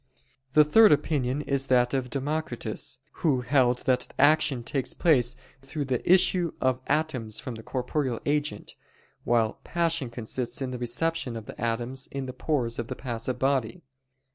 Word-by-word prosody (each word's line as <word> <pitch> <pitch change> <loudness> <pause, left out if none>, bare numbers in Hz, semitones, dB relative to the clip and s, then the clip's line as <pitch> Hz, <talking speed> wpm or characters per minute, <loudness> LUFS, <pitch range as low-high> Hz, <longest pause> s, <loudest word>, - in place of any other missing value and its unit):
The 155 - +7
third 215 +9 +6
opinion 145 -2 +1
is 140 -1 -1
that 125 -1 +3
of 130 -2 -1
Democritus, 145 -1 -3 0.2
who 140 -6 +2
held 125 -1 +2
that 125 -1 +2
action 145 -4 +3
takes 130 +1 -2
place 125 -7 +3 0.3
through 140 +2 -4
the 130 +5 0
issue 180 -2 +4
of 130 -1 +1
atoms 140 -8 0
from 130 - -6
the 110 - -8
corporeal 125 +1 -2
agent, 145 -7 -1 0.5
while 115 -2 +1
passion 165 -6 0
consists 120 +1 -4
in 130 -2 -3
the 125 - -5
reception 125 +2 -1
of 110 -2 -6
the - - -10
atoms 120 +3 -2
in 135 -1 -5
the 130 - -6
pores 125 -4 -1
of 120 - -3
the - - -5
passive 120 0 -4
body. 130 -4 0
130 Hz, 160 wpm, -27 LUFS, 120-150 Hz, 0.5 s, The